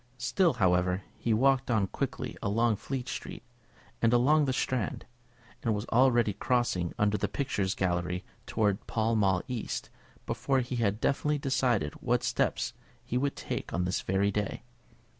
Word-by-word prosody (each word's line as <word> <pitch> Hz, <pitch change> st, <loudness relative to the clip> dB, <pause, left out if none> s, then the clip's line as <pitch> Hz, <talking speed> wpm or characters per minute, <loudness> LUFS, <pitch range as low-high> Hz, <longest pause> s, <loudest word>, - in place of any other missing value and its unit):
Still, 165 Hz, +8 st, +2 dB
however, 90 Hz, 0 st, +2 dB, 0.2 s
he 115 Hz, -, 0 dB
walked 135 Hz, +3 st, +3 dB
on 110 Hz, -4 st, +3 dB
quickly -, -, -4 dB
along 110 Hz, +2 st, +2 dB
Fleet 130 Hz, +1 st, -4 dB
Street, -, -, -6 dB, 0.6 s
and 115 Hz, -, +4 dB
along 145 Hz, +5 st, +4 dB
the 135 Hz, -, +1 dB
Strand, 125 Hz, -4 st, -1 dB, 0.6 s
and 115 Hz, -3 st, +1 dB
was 105 Hz, +2 st, -3 dB
already 120 Hz, -3 st, +4 dB
crossing 105 Hz, -6 st, 0 dB
under 105 Hz, 0 st, +2 dB
the -, -, 0 dB
Picture 135 Hz, -8 st, -1 dB
Galleries 90 Hz, -1 st, -1 dB, 0.2 s
towards 105 Hz, -3 st, +1 dB
Pall 115 Hz, 0 st, +1 dB
Mall 95 Hz, -4 st, +2 dB
East 125 Hz, -3 st, -4 dB, 0.3 s
before 135 Hz, -1 st, 0 dB
he 125 Hz, 0 st, -4 dB
had 105 Hz, -2 st, +1 dB
definitely 150 Hz, +4 st, +1 dB
decided 125 Hz, -, +1 dB
what -, -, +1 dB
steps -, -, 0 dB, 0.3 s
he -, -, -4 dB
would 140 Hz, +3 st, +1 dB
take -, -, -4 dB
on 90 Hz, +1 st, 0 dB
this 90 Hz, -, -1 dB
very 95 Hz, +2 st, +1 dB
day. 105 Hz, +2 st, -3 dB
115 Hz, 155 wpm, -30 LUFS, 100-130 Hz, 0.6 s, and